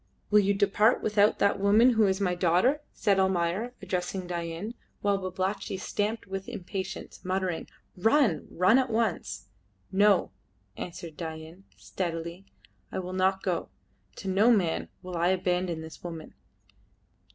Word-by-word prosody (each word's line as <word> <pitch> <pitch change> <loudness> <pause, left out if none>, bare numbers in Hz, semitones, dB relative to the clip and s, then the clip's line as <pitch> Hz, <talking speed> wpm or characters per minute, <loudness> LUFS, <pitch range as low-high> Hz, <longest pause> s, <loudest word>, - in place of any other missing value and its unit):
"Will 210 - +7
you 200 0 +2
depart 210 +3 +3
without 210 -1 +3
that 200 0 +2
woman 210 +5 +5
who 220 -3 +4
is 190 0 +1
my 185 -3 +1
daughter?" 180 - +2
said 200 -3 +1
Almayer, 190 +5 0
addressing 185 0 -2
Dain, 170 +4 -4 0.3
while 200 -1 +2
Babalatchi 190 +1 -3
stamped 210 +3 -2
with 195 0 -5
impatience, 190 +1 -6
muttering, 185 -2 -2 0.3
"Run! 225 - +2
Run 185 +8 +4
at 260 -1 0
once!" 165 - -1 0.4
"No," 205 +1 +4 0.4
answered 170 -2 -7
Dain, 160 +3 -7
steadily, 170 +1 -5 0.4
"I - - -4
will 185 0 -4
not 190 +1 +1
go; 180 -4 -1 0.5
to - - -8
no 195 +5 +4
man 190 -9 +2
will 180 -1 -6
I 170 +1 +2
abandon 180 -2 0
this 160 0 -10
woman." 165 -3 -7
190 Hz, 140 wpm, -28 LUFS, 175-205 Hz, 0.5 s, Will